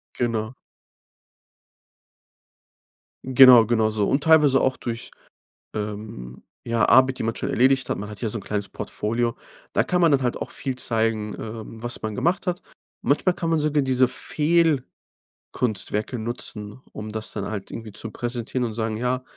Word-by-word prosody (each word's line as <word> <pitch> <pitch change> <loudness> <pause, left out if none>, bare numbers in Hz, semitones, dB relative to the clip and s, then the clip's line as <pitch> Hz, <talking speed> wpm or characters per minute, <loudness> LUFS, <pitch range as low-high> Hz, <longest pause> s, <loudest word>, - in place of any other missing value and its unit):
Genau. 115 -1 -1 2.7
Genau 130 -2 +8
genau 110 -1 +2
so. 105 -2 0
Und 140 +1 +1
teilweise 150 -4 +6
auch 130 0 +1
durch, 120 0 -6 0.6
ähm, 105 - -6 0.2
ja, 115 0 +2
Arbeit, 130 0 +5
die - - -3
man 115 0 -2
schon - - -3
erledigt 130 +1 +3
hat. - - -1
Man 105 - -6
hat 105 -2 -10
ja 115 - -1
so 115 - -3
'n - - -7
kleines 105 -2 -3
Portfolio. 115 +2 -2 0.4
Da - - +3
kann 180 -1 0
man 170 -2 +5
dann 135 -1 +3
halt 125 -1 -1
auch - - -5
viel 135 -2 -3
zeigen, 110 -3 -1
ähm, 110 0 -8
was 120 0 -4
man 110 -1 -4
gemacht 175 - 0
hat. 180 -1 -2 0.4
Manchmal 175 +5 +2
kann 165 -2 -2
man 165 - +2
sogar 150 -1 +1
diese 130 -1 +3
Fehlkunstwerke 150 - 0 1.1
nutzen, 110 -1 -5
um 110 0 -6
das 110 0 -3
dann 100 -2 -4
halt 100 -2 -5
irgendwie 110 -2 -8
zu 115 +2 -5
präsentieren 120 +2 -3
und 115 - -4
sagen: 110 -1 -2
„Ja, 125 +2 -1
120 Hz, 165 wpm, -24 LUFS, 110-130 Hz, 2.7 s, Genau